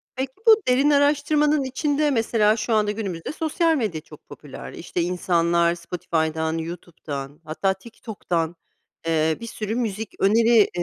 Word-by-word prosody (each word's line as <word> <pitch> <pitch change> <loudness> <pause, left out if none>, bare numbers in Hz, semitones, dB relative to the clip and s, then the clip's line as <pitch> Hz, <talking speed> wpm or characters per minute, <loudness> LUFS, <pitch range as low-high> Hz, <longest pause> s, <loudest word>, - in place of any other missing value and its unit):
Peki, 260 0 -3
bu 440 -1 +7
derin 260 +3 +4
araştırmanın 295 +1 +3
içinde, 290 +3 0
mesela, 225 -3 +2
şu 230 +1 -1
anda 210 -1 +2
günümüzde 195 - -4
sosyal 320 +1 +1
medya 210 - -2
çok 150 -1 -16
popüler. 145 -3 -10
İşte, 175 +1 -4
insanlar 170 -1 +1
Spotify'dan, 160 -2 -2
YouTube'dan, 155 -4 -7
hatta 180 +5 0
TikTok'tan, 190 -5 -4 0.5
eee, 160 -1 +1
bir 230 - -6
sürü 220 -1 -4
müzik 220 -3 -3
öneri 225 +2 +4
210 Hz, 135 wpm, -23 LUFS, 170-260 Hz, 0.5 s, bu